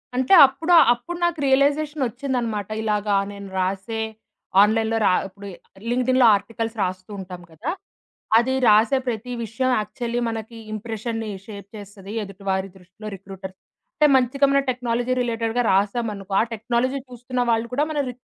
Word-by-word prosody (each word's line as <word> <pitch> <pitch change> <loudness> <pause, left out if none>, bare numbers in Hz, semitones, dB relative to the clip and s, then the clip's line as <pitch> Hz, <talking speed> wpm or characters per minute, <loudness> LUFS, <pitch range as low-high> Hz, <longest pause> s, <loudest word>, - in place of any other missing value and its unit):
అంటే 260 +8 +2
అప్పుడు 320 +6 -1 0.2
అప్పుడు 340 +9 -7
నాకు 340 -2 -1
రియలైజేషనొచ్చిందన్నమాట. 265 -6 0
ఇలాగ 210 -1 -1 0.2
నేను 200 -1 -9
రాసే 195 +4 -2 0.6
ఆన్‌లైన్‌లో 220 +2 +2
రా - - +4
ఇప్పుడు 200 +1 -12 0.4
లింక్డ్‌ఇన్‌లో 255 +1 +3
ఆర్టికల్స్ 225 +2 -4
రాస్తూ 185 +1 -4
ఉంటాం 180 -1 -8
కదా! 160 - -4 0.7
అది 245 +3 +2
రాసే 215 +5 +5
ప్రతి 240 +1 -3
విషయం 230 +4 -1
యాక్చువల్లీ 235 +3 -3
మనకి 225 +1 -6 0.2
ఇంప్రెషన్‌ని 225 +1 -4 0.2
షేప్ 200 -2 -9
చేస్తది 200 0 -10
ఎదుటివారి 195 -1 -3
దృష్టిలో. 185 +4 -11
రిక్రూటర్స్ 190 0 -10 0.4
అంటే, 300 - +8
మంచిగా 265 +2 +3
మన 275 - +4
టెక్నాలజీ 245 0 -1
రిలేటెడ్‌గా 230 0 -1
రాసామనుకో, 200 0 -1
ఆ - - +3
టెక్నాలజీ 240 +4 -1
చూస్తున్న 250 +1 -4
వాళ్ళు 225 0 0
కూడా 285 +4 +2
మన 300 - -2
రి - - -6
225 Hz, 135 wpm, -23 LUFS, 200-250 Hz, 0.7 s, అంటే